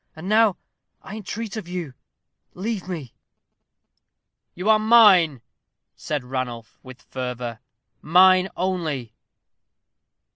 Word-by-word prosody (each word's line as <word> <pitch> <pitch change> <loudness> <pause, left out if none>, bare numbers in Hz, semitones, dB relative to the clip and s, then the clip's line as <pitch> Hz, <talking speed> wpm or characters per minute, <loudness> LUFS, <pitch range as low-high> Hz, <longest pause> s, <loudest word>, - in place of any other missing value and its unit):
And 160 +3 -9
now, 215 -2 +3 0.5
I 205 - -9
entreat 220 +1 -6
of 205 -5 -7
you, 175 -6 -5 0.6
leave 200 0 -4
me." 160 -10 -6 1.4
"You 180 +4 -5
are 220 -1 +5
mine," 205 - +5 0.5
said 150 -4 -4
Ranulph, 125 -4 -6
with 130 -1 -13
fervor; 125 -2 -6 0.4
"mine 185 +3 +5
only." 160 -10 -3
175 Hz, 100 wpm, -23 LUFS, 130-200 Hz, 1.4 s, are